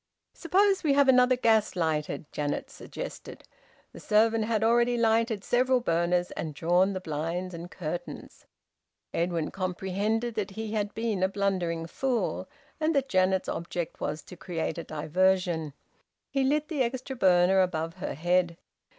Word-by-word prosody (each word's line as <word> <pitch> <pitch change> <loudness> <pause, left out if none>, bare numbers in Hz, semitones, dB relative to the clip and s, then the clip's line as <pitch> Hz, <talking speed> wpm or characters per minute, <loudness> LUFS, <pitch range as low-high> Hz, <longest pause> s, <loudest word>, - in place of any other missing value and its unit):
"Suppose 390 +3 +2
we 295 -3 +3
have 280 0 +4
another 255 -1 +5
gas 220 -5 +2
lighted," 155 -4 -1
Janet 145 -1 -3
suggested. - - -8 0.5
The - - -10
servant 220 +1 +3
had 220 -1 0
already 240 +1 +3
lighted 225 -2 +2
several 255 +3 +2
burners 175 -3 +1
and 155 -3 -5
drawn 175 +5 +2
the 185 - -3
blinds 170 +3 -3
and 170 +1 -7
curtains. 175 -1 -7 0.7
Edwin 170 -2 -1
comprehended 195 +5 -2
that 210 -2 -2
he 215 +2 -5
had 210 -2 -2
been 220 -4 -1
a 190 - +4
blundering 185 -5 -1
fool, 250 +8 -2 0.3
and 315 0 +1
that 275 -1 +1
Janet's 185 0 +2
object 170 0 -4
was 150 +2 -3
to 180 - -11
create 170 -2 -4
a - - -5
diversion. 165 +1 0 0.6
He 275 -1 +1
lit 295 +3 +1
the 300 -4 -2
extra 260 +2 -2
burner 185 -2 +4
above 165 -2 -2
her 180 - -4
head. 175 +2 +1
190 Hz, 150 wpm, -28 LUFS, 170-235 Hz, 0.7 s, another